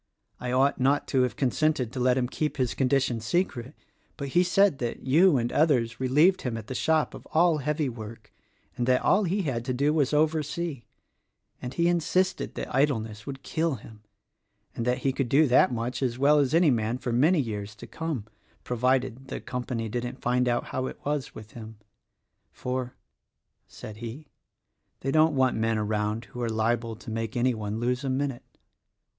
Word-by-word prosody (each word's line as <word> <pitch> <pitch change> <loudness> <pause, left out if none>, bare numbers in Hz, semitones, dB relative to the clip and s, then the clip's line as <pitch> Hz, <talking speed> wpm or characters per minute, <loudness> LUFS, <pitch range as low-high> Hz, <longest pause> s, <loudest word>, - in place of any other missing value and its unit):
I 125 - -3
ought 135 +2 +2
not 140 +3 +2
to 130 - +2
have 125 -3 0
consented 135 -2 0
to 130 - -4
let 125 0 +3
him 125 -1 +1
keep 150 +4 -3
his 125 -3 0
condition 130 -3 +1
secret; 130 - -2 0.4
but 140 -2 -4
he 175 - +3
said 180 -3 +3
that 120 -2 -4
you 155 +4 +5
and 120 0 -1
others 125 -7 +2
relieved 150 +9 +3
him 120 -3 -3
at 110 - -7
the 130 - -6
shop 155 +4 +1
of - - -11
all 165 -1 +4
heavy 150 +1 -1
work, 110 -2 -9 0.4
and 120 - -2
that 125 0 +3
all 200 +1 +3
he 190 +3 0
had 125 -7 -2
to 125 - -1
do 145 +4 +2
was 145 -4 +2
oversee; 155 -1 0 0.4
— - - -46
and 125 +1 -6
he 170 0 +2
insisted 175 +2 0
that - - -5
idleness 110 -7 0
would 135 -1 -7
kill 160 -2 -1
him, 110 -1 -13 0.7
and 115 - -3
that 125 0 +2
he 135 - +2
could 135 -2 -2
do 150 +5 +5
that 130 -1 +4
much 120 +2 -3
as 125 -3 -1
well 145 +3 +4
as 140 +2 +2
any 165 -3 +5
man, 115 0 0
for 120 -2 -3
many 155 +8 +4
years 105 -5 -4
to 100 - -10
come, 160 -10 -4 0.2
— - - -36
provided 125 +1 0
the - - -5
Company 125 -2 -4
didn't 120 +3 -4
find 125 +1 +2
out 120 0 +1
how 130 0 -2
it - - -7
was 145 -2 -2
with 110 0 -10
him. 110 -2 -10 0.7
'For,' 125 0 -4 0.7
said 105 - -10
he, 120 +6 -8 0.7
'they 135 - -1
don't 155 +1 +4
want 130 -3 +2
men 115 0 +1
around 105 +1 -1
who 120 +4 -8
are 120 - -1
liable 115 +1 0
to 110 - -9
make 115 +1 -3
any 125 +1 +2
one 110 -1 -4
lose 125 +3 -1
a 135 - -2
minute.' 135 -1 -3
130 Hz, 195 wpm, -27 LUFS, 115-150 Hz, 0.7 s, you